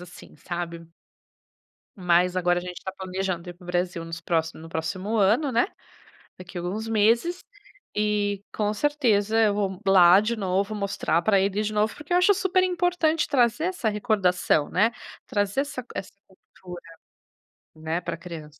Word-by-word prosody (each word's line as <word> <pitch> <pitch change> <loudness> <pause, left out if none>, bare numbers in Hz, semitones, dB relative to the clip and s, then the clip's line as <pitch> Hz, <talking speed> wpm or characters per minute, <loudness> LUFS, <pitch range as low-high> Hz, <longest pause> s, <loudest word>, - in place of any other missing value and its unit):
assim, 180 0 -13
sabe. 170 -1 -6 1.1
Mas 180 -1 +2
agora 175 0 +2
a - - -8
gente 180 0 -7
está 190 - -6
planejando 185 -2 -4
ir 175 - -7
para 175 0 -17
o - - -14
Brasil 175 -1 -2
nos 165 0 -7
próximo 165 -2 -1
no 165 - -10
próximo 185 +7 -3
ano, 225 +8 +3
né, 300 +11 +2 0.7
daqui 180 0 -10
alguns 195 +6 -4
meses. 230 - +2 0.5
E, 205 -1 0
com 210 0 0
certeza 225 -5 +1
eu 215 -2 +4
vou 195 -2 -2
lá 185 0 +7
de 225 +2 -1
novo, 195 +2 -1
mostrar 200 -5 0
pra 205 -3 +4
ele 200 +2 0
de 215 0 -2
novo, 215 +1 +1
porque 305 +4 -5
eu 355 - +5
acho 365 +3 +5
super 375 -1 +1
importante 355 -3 +1
trazer 255 +2 +2
essa 360 -11 -1
recordação, 195 -8 +1
né, 215 +5 +2 0.4
trazer 205 +4 0
essa 280 -2 -5
c 245 - -22
essa 195 - -5 0.2
cultura, 180 -2 -13 0.9
né, 160 +2 -3
pra - - -4
criança. 160 -5 -10
200 Hz, 165 wpm, -25 LUFS, 175-225 Hz, 1.1 s, lá